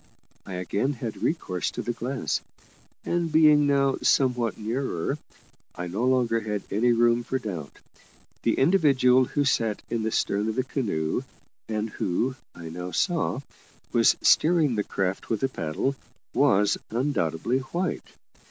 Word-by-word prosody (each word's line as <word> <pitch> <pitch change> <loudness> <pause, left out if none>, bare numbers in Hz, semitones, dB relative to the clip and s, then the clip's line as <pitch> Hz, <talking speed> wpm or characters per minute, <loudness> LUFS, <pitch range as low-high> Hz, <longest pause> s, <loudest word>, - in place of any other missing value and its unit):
I 95 - -6
again 100 +9 -1
had 115 -3 -6
recourse 95 - -1
to - - -5
the 120 - -2
glass, 130 +2 -2 0.6
and 170 -2 0
being 150 -2 +6
now 140 -1 +2
somewhat 125 -4 +2
nearer, 110 -5 -2 0.6
I 90 - -4
no 95 +7 -3
longer 125 -3 +2
had 105 -2 -3
any 115 +5 +3
room 120 0 +3
for 130 - -2
doubt; 90 - -6 0.6
the - - +1
individual 135 -6 +4
who 145 +3 -1
sat 115 -5 0
in 115 - 0
the 110 - 0
stern 105 0 0
of 110 - -3
the 130 - +1
canoe, 100 - -1 0.5
and 110 0 -1
who, 120 +10 -1 0.2
I 85 -1 -8
now 90 +2 -6
saw, 165 - 0 0.5
was 115 -1 +4
steering 160 -4 +4
the 105 -2 0
craft 95 -1 -3
with 110 +1 -1
a 135 - +2
paddle, 85 - -2 0.4
was 105 -8 +3
undoubtedly 120 - 0
white. 170 +7 -3
120 Hz, 145 wpm, -26 LUFS, 105-135 Hz, 0.6 s, being